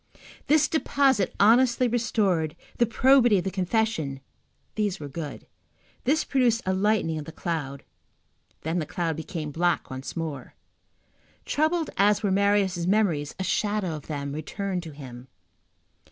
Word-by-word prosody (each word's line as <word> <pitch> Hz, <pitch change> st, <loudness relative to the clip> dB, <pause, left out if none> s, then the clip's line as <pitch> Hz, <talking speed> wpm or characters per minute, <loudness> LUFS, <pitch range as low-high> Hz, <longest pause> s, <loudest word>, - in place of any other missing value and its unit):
The 305 Hz, 0 st, +4 dB
deposit 275 Hz, -, +2 dB
honestly 240 Hz, +4 st, +5 dB
restored, 205 Hz, -9 st, 0 dB, 0.2 s
the 235 Hz, -, +4 dB
probity 245 Hz, -2 st, +5 dB
of 180 Hz, -, -1 dB
the 190 Hz, -, -2 dB
confession—these 190 Hz, -, -3 dB
were 145 Hz, -, -6 dB
good. 145 Hz, +1 st, -7 dB, 0.6 s
This 300 Hz, +5 st, +2 dB
produced 245 Hz, -4 st, +1 dB
a 190 Hz, -, +1 dB
lightening 190 Hz, -5 st, +1 dB
of 150 Hz, -, -7 dB
the 160 Hz, -, -8 dB
cloud, 155 Hz, -5 st, -4 dB, 0.8 s
then 160 Hz, +3 st, -1 dB
the 155 Hz, -, -3 dB
cloud 165 Hz, -3 st, -2 dB
became 160 Hz, -1 st, -5 dB
black 175 Hz, 0 st, 0 dB
once 130 Hz, +5 st, -6 dB
more. 150 Hz, -6 st, -5 dB, 0.9 s
Troubled 315 Hz, +2 st, 0 dB
as 205 Hz, +2 st, +3 dB
were 200 Hz, -, +1 dB
Marius' 195 Hz, -3 st, +2 dB
memories, 180 Hz, -8 st, +1 dB
a -, -, -1 dB
shadow 205 Hz, -2 st, 0 dB
of 150 Hz, -, -10 dB
them 140 Hz, -2 st, -4 dB
returned 185 Hz, +4 st, -3 dB
to 165 Hz, -2 st, -9 dB
him. 130 Hz, -3 st, -10 dB
190 Hz, 140 wpm, -26 LUFS, 155-220 Hz, 0.9 s, honestly